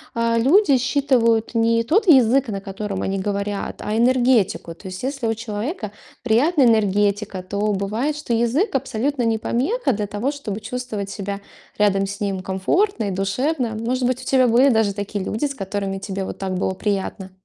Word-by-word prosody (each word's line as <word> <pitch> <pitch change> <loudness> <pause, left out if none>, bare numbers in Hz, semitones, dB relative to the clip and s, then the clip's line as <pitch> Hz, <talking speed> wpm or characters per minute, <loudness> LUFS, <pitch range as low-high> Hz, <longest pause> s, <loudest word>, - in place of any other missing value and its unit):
а, 230 0 +1
люди 285 - +4
считывают 245 -4 +2
не 230 0 +2
тот 390 - +2
язык, 265 -3 +5
на 200 -3 -3
котором 195 0 -5
они 195 0 -1
говорят, 200 +1 -3
а 210 +1 -1
энергетику. 240 -7 +2
То 190 - -12
есть 185 +4 -7
если 270 -3 -2
у 225 - 0
человека 220 - -4 0.3
приятная 265 +6 +3
энергетика, 205 -3 +1
то 200 +2 -1
бывает, 220 +10 -1
что 295 -5 -3
язык 240 - +1
абсолютно 265 0 -1
не 225 -1 +1
помеха 275 - 0
для 210 -3 -2
того, 210 +8 -2
чтобы 220 -8 -5
чувствовать 225 -6 -5
себя 200 0 -5 0.4
рядом 195 -1 +2
с 205 +2 -6
ним 195 -2 -1
комфортно 215 - 0
и 200 - -2
душевно. 230 - -1
Может 250 +2 -1
быть, 255 0 -1
у - - -10
тебя 260 -1 +3
были 245 +4 +5
даже 220 -5 +2
такие 205 -1 -4
люди, 220 +8 -2
с 280 - -2
которыми 195 -2 -3
тебе 195 0 -4
вот - - -6
так 190 -1 -3
было 190 +1 -1
приятно. 195 -1 -3
225 Hz, 180 wpm, -21 LUFS, 200-255 Hz, 0.4 s, язык